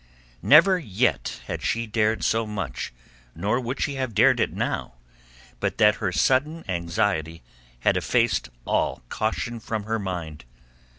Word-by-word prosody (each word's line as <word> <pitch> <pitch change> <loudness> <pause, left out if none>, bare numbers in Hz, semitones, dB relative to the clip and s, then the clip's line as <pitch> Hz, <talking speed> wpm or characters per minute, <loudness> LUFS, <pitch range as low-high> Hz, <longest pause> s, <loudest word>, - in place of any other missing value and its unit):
Never 180 +6 +6
yet 120 - -1
had - - -4
she 115 +1 -1
dared 110 0 0
so 115 0 +1
much 95 -12 -4 0.4
nor 105 +9 0
would 125 +1 -4
she 145 - -1
have 130 -5 -3
dared 125 +3 +5
it 110 - +1
now 60 - -3 0.6
but - - -2
that 105 -1 +5
her 95 -4 -1
sudden 145 - +1
anxiety 85 - -1 0.4
had - - +3
effaced - - +1 0.2
all - - 0
caution 115 +2 -2
from 110 -1 -4
her 110 +1 -2
mind. 85 -7 -5
110 Hz, 140 wpm, -25 LUFS, 95-120 Hz, 0.6 s, Never